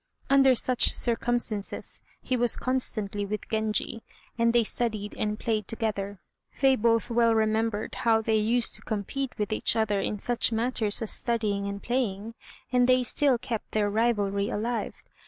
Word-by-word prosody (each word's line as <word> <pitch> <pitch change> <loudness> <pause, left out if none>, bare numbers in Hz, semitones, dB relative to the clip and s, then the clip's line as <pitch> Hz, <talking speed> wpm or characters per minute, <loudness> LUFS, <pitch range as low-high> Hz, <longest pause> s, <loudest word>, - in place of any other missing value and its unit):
Under 270 -2 +6
such 250 +1 +2
circumstances 235 -3 -1 0.2
he 255 - -1
was 240 -1 +3
constantly 215 -6 0
with 210 +1 -5
Genji, 220 +1 -1 0.3
and 230 0 +2
they 235 0 +3
studied 215 -2 -2
and 210 0 -2
played 215 -3 -2
together. 205 -4 -3 0.4
They 270 -1 +4
both 230 0 +1
well 230 -1 +3
remembered 220 0 0
how 225 -1 +3
they 220 0 +1
used 230 +2 +1
to - - -3
compete 245 +6 -4
with 210 +1 -2
each 215 - +1
other 210 -3 +1
in 210 - -2
such 240 +3 +1
matters 225 -2 0
as 220 - 0
studying 210 -4 0
and 200 0 -6
playing, 230 -3 -2 0.4
and 250 -1 +3
they 255 0 +4
still 265 +1 +2
kept 230 -2 -6
their 205 -1 +1
rivalry 205 -3 0
alive. 230 +3 -3
225 Hz, 155 wpm, -27 LUFS, 210-240 Hz, 0.4 s, Under